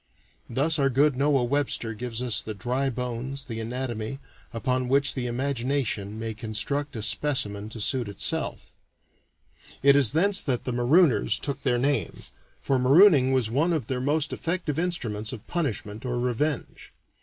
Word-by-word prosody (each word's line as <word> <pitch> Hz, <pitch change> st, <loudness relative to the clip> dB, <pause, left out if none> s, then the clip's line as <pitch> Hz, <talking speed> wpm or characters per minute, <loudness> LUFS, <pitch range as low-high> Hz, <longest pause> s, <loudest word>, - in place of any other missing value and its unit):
Thus 150 Hz, +6 st, +1 dB
our 135 Hz, -1 st, +3 dB
good 140 Hz, +2 st, +3 dB
Noah 140 Hz, -1 st, +2 dB
Webster 120 Hz, -3 st, -1 dB
gives 120 Hz, +1 st, -5 dB
us 120 Hz, -4 st, +1 dB
the 110 Hz, -, -6 dB
dry 125 Hz, +7 st, -1 dB
bones, 125 Hz, +2 st, -4 dB
the 115 Hz, -4 st, -5 dB
anatomy, 120 Hz, 0 st, -4 dB, 0.3 s
upon 125 Hz, +2 st, -1 dB
which 135 Hz, +2 st, +3 dB
the 125 Hz, -2 st, -3 dB
imagination 120 Hz, -4 st, -2 dB
may 110 Hz, 0 st, -4 dB
construct 120 Hz, +6 st, -3 dB
a 110 Hz, -, -4 dB
specimen 110 Hz, -4 st, -1 dB
to 110 Hz, -, -9 dB
suit 120 Hz, +2 st, 0 dB
itself. 100 Hz, -, -2 dB, 1.1 s
It 140 Hz, 0 st, +7 dB
is 140 Hz, -3 st, +3 dB
thence 195 Hz, +5 st, +4 dB
that 125 Hz, -4 st, -1 dB
the 125 Hz, -, -3 dB
marooners 130 Hz, +5 st, +3 dB
took 140 Hz, -1 st, -4 dB
their 125 Hz, -3 st, +1 dB
name, 140 Hz, +3 st, -1 dB, 0.4 s
for 135 Hz, -2 st, +1 dB
marooning 140 Hz, 0 st, +6 dB
was 125 Hz, -4 st, +1 dB
one 155 Hz, +8 st, +2 dB
of 155 Hz, -8 st, -1 dB
their 125 Hz, +1 st, -2 dB
most 150 Hz, +3 st, +1 dB
effective 165 Hz, -3 st, -2 dB
instruments 120 Hz, -12 st, -2 dB
of 110 Hz, -, -9 dB
punishment 115 Hz, -, -3 dB
or 125 Hz, -1 st, -2 dB
revenge. 125 Hz, +4 st, -2 dB
130 Hz, 155 wpm, -26 LUFS, 115-140 Hz, 1.1 s, It